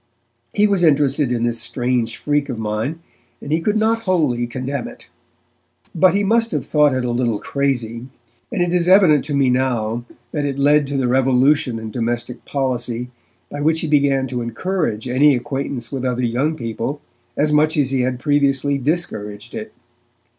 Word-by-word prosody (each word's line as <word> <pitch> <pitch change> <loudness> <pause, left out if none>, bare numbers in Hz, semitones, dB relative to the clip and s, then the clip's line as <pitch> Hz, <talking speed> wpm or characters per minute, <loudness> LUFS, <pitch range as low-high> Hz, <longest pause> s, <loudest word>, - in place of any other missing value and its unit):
He 210 - +3
was 200 -4 +2
interested 145 -3 +3
in 120 -1 0
this 120 -1 -1
strange 120 -1 -1
freak 145 -1 -1
of 125 - -3
mine, 110 +9 -3 0.4
and 145 - -8
he 160 +1 +1
could 210 +5 +1
not 220 +1 +2
wholly 145 -10 +1
condemn 130 +2 -4
it. - - -13 0.8
But 185 +3 +4
he 205 - +2
must 230 +3 +2
have - - -2
thought 150 -1 +3
is 130 -1 -1
a - - -1
little 120 -2 0
crazy, 120 -3 -2 0.4
and 200 -7 +1
it 175 0 -1
is 175 -1 +1
evident 180 -7 +6
to 145 -1 -2
me 135 -2 +3
now 120 -3 0 0.3
that 150 - -2
it 140 -1 -2
led 145 +1 +3
to 140 0 -2
the 130 -2 +1
revolution 130 0 +2
in 110 -1 -6
domestic 120 +1 -3
policy 125 -3 -2 0.4
by 145 - -5
which 160 +2 +2
he - - -2
began 140 -2 +2
to 125 -1 -3
encourage 115 - -2
any 135 +3 +4
acquaintance 135 -2 -4
with 135 -2 -4
other 125 -1 -1
young 135 +7 0
people 115 +3 -4 0.4
as 150 +1 +2
much 155 +1 +3
as 135 -3 +1
he 135 - +1
had 125 0 -1
previously 140 0 +1
discouraged 110 -9 -3
it. 220 -1 -6
135 Hz, 180 wpm, -20 LUFS, 120-150 Hz, 0.8 s, evident